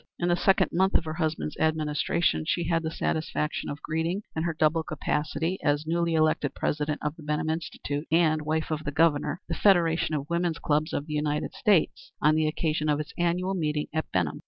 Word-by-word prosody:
In 175 Hz, -, 0 dB
the 175 Hz, -, +4 dB
second 190 Hz, +2 st, +3 dB
month 190 Hz, +2 st, +2 dB
of -, -, +3 dB
her 155 Hz, -, -3 dB
husband's 155 Hz, -2 st, -2 dB
administration, 155 Hz, -, +1 dB
she 175 Hz, -, +1 dB
had 165 Hz, 0 st, +1 dB
the 160 Hz, -, -2 dB
satisfaction 155 Hz, -1 st, -2 dB
of 145 Hz, -, -6 dB
greeting, 165 Hz, +6 st, -1 dB
in 160 Hz, -, -1 dB
her 170 Hz, 0 st, -1 dB
double 155 Hz, +1 st, +3 dB
capacity 155 Hz, +3 st, -2 dB
as 145 Hz, +1 st, +1 dB
newly 170 Hz, +1 st, 0 dB
elected 155 Hz, -2 st, +1 dB
President 150 Hz, 0 st, -1 dB
of 150 Hz, +1 st, -2 dB
the -, -, -11 dB
Benham 150 Hz, +1 st, -1 dB
Institute 155 Hz, -2 st, -4 dB
and 160 Hz, -2 st, +3 dB
wife 155 Hz, +1 st, -2 dB
of 155 Hz, 0 st, -2 dB
the 150 Hz, -, -2 dB
Governor, 150 Hz, 0 st, +2 dB
the 170 Hz, -, -3 dB
Federation 165 Hz, -4 st, +3 dB
of 145 Hz, -1 st, -3 dB
Women's 170 Hz, -1 st, 0 dB
Clubs 155 Hz, +2 st, 0 dB
of 145 Hz, -, -2 dB
the 150 Hz, -, -6 dB
United 150 Hz, 0 st, -1 dB
States, 205 Hz, -, +1 dB
on 150 Hz, +1 st, +4 dB
the 155 Hz, 0 st, +2 dB
occasion 155 Hz, 0 st, -1 dB
of 145 Hz, 0 st, +2 dB
its 150 Hz, -, -5 dB
annual 175 Hz, +2 st, 0 dB
meeting 150 Hz, -4 st, -1 dB
at 160 Hz, 0 st, -2 dB
Benham. 85 Hz, -5 st, 0 dB
155 Hz, 205 wpm, -27 LUFS, 150-170 Hz, -, the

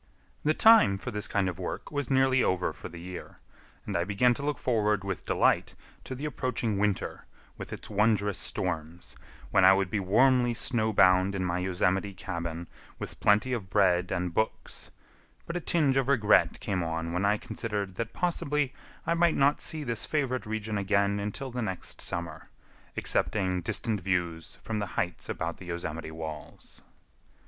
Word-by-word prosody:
The 155 Hz, +1 st, +2 dB
time 220 Hz, -, +6 dB
for 125 Hz, +5 st, -6 dB
this 105 Hz, -1 st, -2 dB
kind 100 Hz, -2 st, 0 dB
of 90 Hz, -3 st, -4 dB
work -, -, -5 dB
was 145 Hz, -1 st, -2 dB
nearly 130 Hz, -1 st, +4 dB
over 90 Hz, -1 st, 0 dB
for -, -, -9 dB
the 85 Hz, -, -10 dB
year, 90 Hz, +1 st, -8 dB, 0.5 s
and -, -, -4 dB
I 85 Hz, -, +2 dB
began 105 Hz, +6 st, +3 dB
to 130 Hz, -, -7 dB
look 145 Hz, -1 st, -1 dB
forward 105 Hz, -5 st, +1 dB
with 95 Hz, -3 st, -4 dB
delight -, -, +2 dB, 0.3 s
to 130 Hz, -, -5 dB
the 140 Hz, +4 st, -5 dB
approaching 125 Hz, -7 st, -2 dB
winter 105 Hz, -2 st, -1 dB, 0.3 s
with -, -, -8 dB
its -, -, -6 dB
wondrous 105 Hz, -1 st, +1 dB
storms, 85 Hz, -1 st, -3 dB, 0.4 s
when 95 Hz, -, +4 dB
I 95 Hz, +1 st, +8 dB
would 95 Hz, -1 st, 0 dB
be 105 Hz, -, 0 dB
warmly 120 Hz, +5 st, +3 dB
snow 115 Hz, -3 st, +1 dB
bound 95 Hz, -1 st, +4 dB
in 95 Hz, -1 st, -1 dB
my 90 Hz, 0 st, -1 dB
Yosemite 95 Hz, +2 st, 0 dB
cabin 85 Hz, -3 st, -5 dB, 0.3 s
with -, -, -7 dB
plenty 105 Hz, +5 st, +3 dB
of 105 Hz, -6 st, -4 dB
bread 90 Hz, -3 st, +2 dB
and 90 Hz, -2 st, -2 dB
books; 110 Hz, +5 st, -3 dB, 0.6 s
but 170 Hz, -, -5 dB
a -, -, 0 dB
tinge 150 Hz, -5 st, +2 dB
of 135 Hz, -1 st, +1 dB
regret 115 Hz, -7 st, +3 dB
came 95 Hz, -4 st, -1 dB
on 80 Hz, 0 st, -3 dB
when 90 Hz, +2 st, 0 dB
I 105 Hz, +1 st, +3 dB
considered 105 Hz, -3 st, -4 dB
that 115 Hz, -1 st, -3 dB
possibly 150 Hz, -5 st, -1 dB, 0.3 s
I -, -, +2 dB
might 170 Hz, 0 st, +3 dB
not 140 Hz, +1 st, +3 dB
see 155 Hz, -1 st, -1 dB
this 120 Hz, -4 st, -2 dB
favorite 130 Hz, -6 st, -1 dB
region 110 Hz, -1 st, -2 dB
again 100 Hz, 0 st, +1 dB
until 105 Hz, +6 st, -4 dB
the 125 Hz, 0 st, -3 dB
next 95 Hz, -5 st, -5 dB
summer, 80 Hz, -2 st, -4 dB, 0.5 s
excepting 95 Hz, -3 st, +1 dB
distant 105 Hz, +4 st, -1 dB
views 85 Hz, -3 st, -2 dB
from 110 Hz, -1 st, -3 dB
the 100 Hz, -, -2 dB
heights 90 Hz, -1 st, -2 dB
about 85 Hz, 0 st, -3 dB
the 90 Hz, -, -10 dB
Yosemite 85 Hz, -2 st, -5 dB
walls. 80 Hz, -1 st, -8 dB
100 Hz, 175 wpm, -28 LUFS, 90-125 Hz, 0.6 s, I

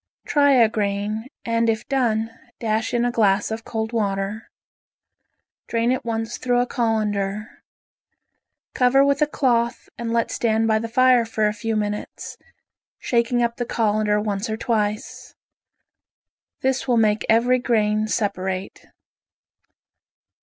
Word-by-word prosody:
Try 285 Hz, -1 st, +4 dB
a 240 Hz, -4 st, +6 dB
grain, 210 Hz, +1 st, -2 dB, 0.2 s
and 230 Hz, 0 st, +1 dB
if 220 Hz, -1 st, -2 dB
done 230 Hz, -5 st, 0 dB, 0.3 s
dash 220 Hz, 0 st, -1 dB
in 240 Hz, -1 st, +1 dB
a 245 Hz, -, +1 dB
glass 205 Hz, -3 st, +2 dB
of 225 Hz, +1 st, -4 dB
cold 220 Hz, 0 st, -4 dB
water. 200 Hz, 0 st, -2 dB, 1.2 s
Drain 230 Hz, +1 st, +1 dB
at 255 Hz, -, -1 dB
once 225 Hz, 0 st, -3 dB
through 245 Hz, -1 st, +1 dB
a 245 Hz, -, +2 dB
colander. 215 Hz, -3 st, -2 dB, 1.1 s
Cover 265 Hz, +2 st, +4 dB
with 280 Hz, 0 st, +1 dB
a 300 Hz, -, +4 dB
cloth 240 Hz, -5 st, 0 dB
and 235 Hz, -1 st, -3 dB
let 230 Hz, 0 st, 0 dB
stand 225 Hz, -1 st, +1 dB
by 220 Hz, -1 st, +2 dB
the 230 Hz, +1 st, -5 dB
fire 255 Hz, 0 st, +4 dB
for 220 Hz, -1 st, -1 dB
a 210 Hz, -, -1 dB
few 225 Hz, +1 st, -3 dB
minutes, 210 Hz, -1 st, -4 dB, 0.6 s
shaking 240 Hz, 0 st, +1 dB
up 235 Hz, 0 st, -1 dB
the 245 Hz, -, -1 dB
colander 210 Hz, -1 st, +1 dB
once 210 Hz, 0 st, -2 dB
or 220 Hz, -, -2 dB
twice. 215 Hz, -3 st, -2 dB, 1.3 s
This 265 Hz, 0 st, 0 dB
will 245 Hz, -2 st, +3 dB
make 215 Hz, -1 st, +2 dB
every 245 Hz, +3 st, +4 dB
grain 215 Hz, -3 st, +1 dB
separate. 190 Hz, -3 st, -3 dB
225 Hz, 135 wpm, -22 LUFS, 215-240 Hz, 1.3 s, a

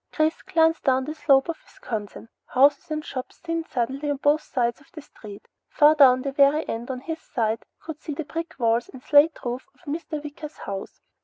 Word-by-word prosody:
Chris 310 Hz, +1 st, 0 dB
glanced 325 Hz, -3 st, +2 dB
down 260 Hz, -1 st, +2 dB
the 305 Hz, -, -4 dB
slope 275 Hz, -3 st, +3 dB
of 335 Hz, -1 st, -4 dB
Wisconsin. 215 Hz, -1 st, -7 dB, 0.2 s
Houses 285 Hz, +5 st, +3 dB
and 310 Hz, 0 st, -3 dB
shops 255 Hz, -1 st, -6 dB
thinned 330 Hz, -1 st, -4 dB
suddenly 270 Hz, +4 st, -2 dB
on 290 Hz, -, 0 dB
both 290 Hz, +2 st, +2 dB
sides 240 Hz, +1 st, -2 dB
of 280 Hz, -, -23 dB
the 310 Hz, -, -8 dB
street. 205 Hz, -7 st, -13 dB, 0.2 s
Far 300 Hz, +1 st, +6 dB
down 260 Hz, -4 st, +6 dB
at -, -, -8 dB
the 275 Hz, -, -2 dB
very 280 Hz, +3 st, +3 dB
end, 230 Hz, +2 st, -4 dB
on 255 Hz, -1 st, -4 dB
his 320 Hz, +3 st, -5 dB
side, 225 Hz, -1 st, -1 dB, 0.2 s
he -, -, -30 dB
could 315 Hz, -2 st, -7 dB
see 300 Hz, -, -5 dB
the 320 Hz, -, -4 dB
brick 330 Hz, +1 st, -5 dB
walls 230 Hz, -1 st, +1 dB
and 260 Hz, -1 st, -12 dB
slate 300 Hz, +2 st, +5 dB
roof 245 Hz, +4 st, -4 dB
of -, -, -27 dB
Mr. 315 Hz, -1 st, -4 dB
Wicker's 300 Hz, +1 st, -8 dB
house. 195 Hz, -1 st, -7 dB
285 Hz, 215 wpm, -24 LUFS, 255-310 Hz, 0.2 s, Far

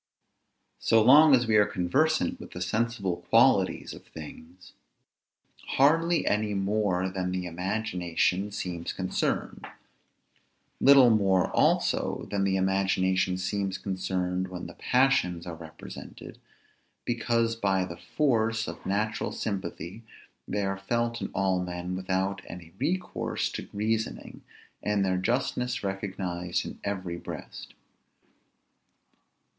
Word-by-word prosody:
So 115 Hz, -, +4 dB
long 145 Hz, +4 st, +8 dB
as 125 Hz, -1 st, +1 dB
we 110 Hz, -1 st, +3 dB
are 105 Hz, -, +6 dB
conversant 160 Hz, -, +1 dB
with -, -, -11 dB
the 90 Hz, -, -6 dB
sensible 105 Hz, -2 st, -1 dB
qualities 115 Hz, -5 st, +3 dB
of -, -, -12 dB
things, 85 Hz, +3 st, -12 dB, 1.0 s
hardly 165 Hz, +5 st, +4 dB
any 105 Hz, 0 st, 0 dB
more 95 Hz, -2 st, 0 dB
than 95 Hz, -1 st, -3 dB
the 90 Hz, 0 st, -2 dB
imagination 90 Hz, +1 st, -1 dB
seems 90 Hz, -4 st, -4 dB
concerned; 95 Hz, -1 st, -2 dB, 1.1 s
little 135 Hz, -3 st, +7 dB
more 95 Hz, -4 st, +3 dB
also -, -, +1 dB
than 100 Hz, -1 st, +1 dB
the 95 Hz, -1 st, +1 dB
imagination 95 Hz, -1 st, +1 dB
seems 95 Hz, +1 st, -2 dB
concerned 95 Hz, -1 st, -2 dB
when 90 Hz, -1 st, -7 dB
the -, -, -8 dB
passions 125 Hz, -10 st, +2 dB
are 85 Hz, -, -5 dB
represented, 80 Hz, -1 st, -10 dB, 0.7 s
because 115 Hz, -1 st, +1 dB
by 95 Hz, -4 st, +1 dB
the 85 Hz, -2 st, -8 dB
force 115 Hz, -, 0 dB
of -, -, -7 dB
natural 105 Hz, +3 st, -1 dB
sympathy 100 Hz, -1 st, -5 dB, 0.5 s
they 105 Hz, 0 st, -1 dB
are 95 Hz, 0 st, -2 dB
felt 115 Hz, +3 st, -1 dB
in -, -, -3 dB
all 95 Hz, -1 st, +1 dB
men 90 Hz, 0 st, -4 dB
without 95 Hz, +1 st, -1 dB
any 85 Hz, -2 st, -10 dB
recourse 175 Hz, +7 st, -1 dB
to -, -, -6 dB
reasoning, 110 Hz, +2 st, -2 dB, 0.4 s
and 105 Hz, -1 st, +1 dB
their 95 Hz, -1 st, +1 dB
justness 125 Hz, +4 st, -1 dB
recognized 95 Hz, -3 st, -3 dB
in -, -, -8 dB
every 95 Hz, -4 st, -3 dB
breast. -, -, -9 dB
95 Hz, 120 wpm, -28 LUFS, 90-115 Hz, 1.1 s, long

